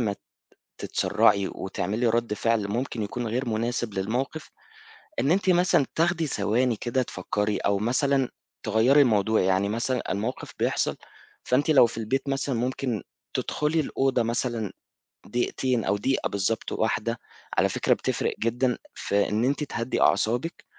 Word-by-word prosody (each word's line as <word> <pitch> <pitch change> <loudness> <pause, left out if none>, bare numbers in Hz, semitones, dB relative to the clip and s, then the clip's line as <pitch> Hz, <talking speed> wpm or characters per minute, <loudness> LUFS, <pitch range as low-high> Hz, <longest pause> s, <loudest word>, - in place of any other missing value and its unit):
ما 105 -4 0 0.6
تتسرّعي 100 -1 +2
وتعملي 105 +5 -2
رد 115 -1 +1
فعل 115 -1 +1
ممكن 120 +2 -2
يكون 115 +3 -3
غير 120 +3 -1
مناسب 115 0 -1
للموقف، 120 +11 -2 0.7
إن 140 - +2
أنتِ 190 +1 +2
مثلًا 175 -5 +4
تاخدي 165 0 +1
ثواني 115 +1 +1
كده 120 +4 -1
تفكّري، 105 0 -2
أو 100 0 +1
مثلًا 130 +4 +1 0.3
تغيّري 115 +7 +4
الموضوع 110 -4 +3
يعني 95 +2 +2
مثلًا 120 +3 -1
الموقف 110 +6 -3
بيحصل - - +1 0.5
فأنتِ 135 +5 +1
لو 140 -5 +7
في 115 - -5
البيت 135 +5 -1
مثلًا 135 -1 -1
ممكن 125 -1 -2 0.3
تدخلي 150 +2 0
الأوضة 135 -4 +1
مثلًا 115 -2 -2 0.6
دقيقتين 120 +1 0
أو - - +1
دقيقة 130 +7 0
بالضبط 100 +3 -1
واحدة، 115 +1 -1 0.4
على - - +4
فكرة - - +2
بتفرِق - - -1
جدًا 120 +2 +1 0.2
في 100 0 0
إن 110 +3 0
أنتِ 140 +3 +1
تهدي 115 -3 -2
أعصابِك، 120 +9 +1
120 Hz, 140 wpm, -26 LUFS, 110-135 Hz, 0.7 s, لو